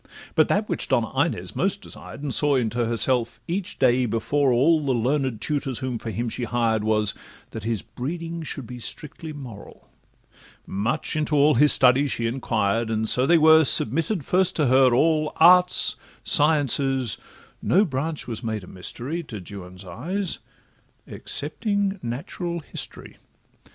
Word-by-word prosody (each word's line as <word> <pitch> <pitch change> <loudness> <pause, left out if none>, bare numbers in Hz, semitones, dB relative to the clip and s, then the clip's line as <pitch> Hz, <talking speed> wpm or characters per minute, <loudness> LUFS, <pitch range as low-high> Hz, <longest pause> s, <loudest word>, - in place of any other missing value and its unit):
But - - +3
that - - 0
which - - -1
Donna - - 0
Inez - - -1
most - - -1
desired, 140 - -9
And 140 -3 -2
saw 150 -3 +4
into 120 -1 0
herself 115 0 0
each 185 +3 -3
day 125 -1 +3
before 130 +5 0
all 150 +6 +3
The 135 -2 0
learned 130 0 -1
tutors 135 -1 -2
whom 130 -3 -4
for 115 - -6
him 120 +2 -3
she 120 +1 -3
hired, 115 -3 0
Was, 105 -1 +1 0.4
that 110 -2 -7
his 115 -3 -2
breeding 165 +5 -6
should 145 -4 -5
be 125 +1 -9
strictly 155 +5 -7
moral; 130 -9 -11 0.8
Much 115 +12 -2
into 155 0 0
all 145 +1 +5
his 150 0 +5
studies 130 +2 +4
she 115 - -2
inquired, 115 -2 -1
And 110 0 -1
so 125 +4 +3
they 170 - +5
were 160 0 +6
submitted 155 - +2
first 185 0 +2
to 150 - +1
her, 130 0 +4
all, 155 +4 +2
Arts, 180 +2 +5 0.3
sciences, 135 -5 +2 0.4
no 195 +4 +3
branch 155 0 -3
was 120 0 -5
made 110 -3 -3
a - - -12
mystery 125 - -4
To 115 -10 -8
Juan's 90 0 -10
eyes, 175 - -3 0.7
excepting 200 +5 -3
natural 170 +8 -5
history. - - -7
130 Hz, 155 wpm, -24 LUFS, 115-155 Hz, 0.8 s, were